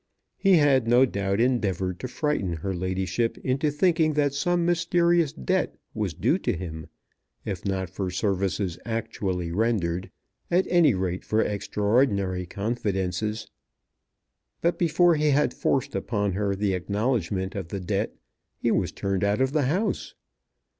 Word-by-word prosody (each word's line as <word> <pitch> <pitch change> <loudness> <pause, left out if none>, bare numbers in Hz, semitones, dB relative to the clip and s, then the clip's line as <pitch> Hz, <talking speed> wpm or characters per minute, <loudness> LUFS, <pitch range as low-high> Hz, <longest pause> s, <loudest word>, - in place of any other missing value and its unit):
He 195 -1 +4
had 135 -6 +4
no 120 +3 +6
doubt 100 -3 -1
endeavoured 95 -7 0
to 130 - -4
frighten 125 - -1
her 85 +4 -3
ladyship 95 +5 -1
into 135 +4 +1
thinking 160 +1 +2
that 145 -2 +1
some 175 +4 +1
mysterious 170 -2 +2
debt 185 +4 -1 0.2
was 105 -7 -2
due - - +1
to - - 0
him, 80 -3 -6 0.6
if 95 -3 -4
not 95 -1 -1
for 95 +1 -4
services 95 -1 -1
actually 105 -6 -3
rendered, 95 -4 0 0.4
at 180 +2 +3
any 165 - +5
rate 90 -1 -2
for 110 +1 +1
extraordinary 100 -2 0
confidences. 105 0 -2 1.1
But 170 +1 0
before 170 +1 +4
he 150 -1 +1
had 145 +1 +2
forced 135 - 0
upon 100 +1 -1
her 100 +1 -1
the 100 0 0
acknowledgment 100 -1 -1
of 95 -4 -5
the 100 +3 -4
debt, 90 - -2 0.4
he - - 0
was - - +1
turned 100 -1 -2
out 100 +2 +1
of 130 0 +2
the 145 -3 +1
house! 195 +6 -1
105 Hz, 145 wpm, -26 LUFS, 95-145 Hz, 1.1 s, no